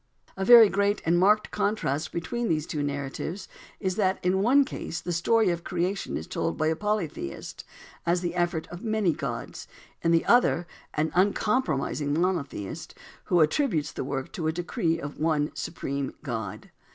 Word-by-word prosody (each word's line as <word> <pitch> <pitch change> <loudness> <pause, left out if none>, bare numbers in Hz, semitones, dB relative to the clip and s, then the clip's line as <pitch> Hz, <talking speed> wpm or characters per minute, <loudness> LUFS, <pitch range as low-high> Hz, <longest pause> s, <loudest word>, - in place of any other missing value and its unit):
A 190 - -3
very 230 +1 +9
great 200 +1 +1
and 170 +1 +3
marked 210 +3 +3
contrast 155 -8 -1
between 235 +8 -2
these 155 -2 +1
two 150 -3 -3
narratives 145 +6 -4 0.3
is 185 -1 -2
that 190 -3 +2
in 190 +1 +2
one 270 +6 +5
case 165 - -5
the 175 - -4
story 220 +5 +3
of 170 0 -3
creation 180 +2 -2
is 80 - -6
told 80 0 -2
by - - 0
a 160 - +1
polytheist, 180 - -3 0.4
as 175 +1 +1
the 175 -1 -2
effort 175 -2 0
of 175 +1 -9
many 215 -6 +1
gods; 140 -7 -5 0.3
in 165 - +1
the 165 0 +3
other, 235 -8 +4 0.3
by 155 - +3
an 160 - -2
uncompromising 180 - +1
monotheist, 170 - -3 0.3
who 175 -2 +3
attributes 160 - +1
the - - -4
work 135 0 -4
to 160 - -3
a - - +2
decree 165 -1 -1
of 145 -1 -7
one 155 -1 +1
Supreme 140 -4 -4
God. 110 -8 -5
170 Hz, 170 wpm, -27 LUFS, 150-200 Hz, 0.4 s, very